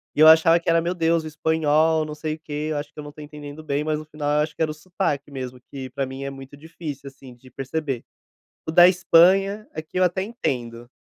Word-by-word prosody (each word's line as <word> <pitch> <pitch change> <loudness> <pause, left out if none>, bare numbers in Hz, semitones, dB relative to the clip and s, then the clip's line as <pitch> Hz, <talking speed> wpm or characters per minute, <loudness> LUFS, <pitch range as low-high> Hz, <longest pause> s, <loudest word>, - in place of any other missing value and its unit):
e 150 - +1
eu 155 - +10
achava 165 +1 +6
que - - -2
era, 165 0 +4
"Meu 170 +2 -1
Deus, 165 -1 +1
o - - -4
espanhol 160 0 +2
não 150 0 -7
sei 155 0 -3
o - - -18
quê, 150 -1 -5
eu 150 - -1
acho 145 0 -6
que - - -48
eu - - -6
não 145 - -9
tô 150 - -16
entendendo 150 0 -9
bem", 145 0 -1
mas 155 0 -1
no 155 - -9
final 150 -1 -4
eu - - +3
acho 155 +1 -6
que - - -7
era 155 -1 +1
o - - -5
sotaque 150 -3 -3
mesmo 130 -2 -7
que 135 -2 -7
pra 135 - -3
mim 135 +1 -7
é 140 - -3
muito 135 0 -11
difícil, 150 -2 -8
assim, 130 -2 -14
de 130 +1 -18
perceber, 135 -1 -4 0.6
o - - +1
da 175 +2 +8
Espanha 190 +3 +4
aqui 160 +3 -5
eu 185 - +4
até 185 +1 0
entendo. 120 - -4
155 Hz, 255 wpm, -23 LUFS, 140-165 Hz, 0.6 s, eu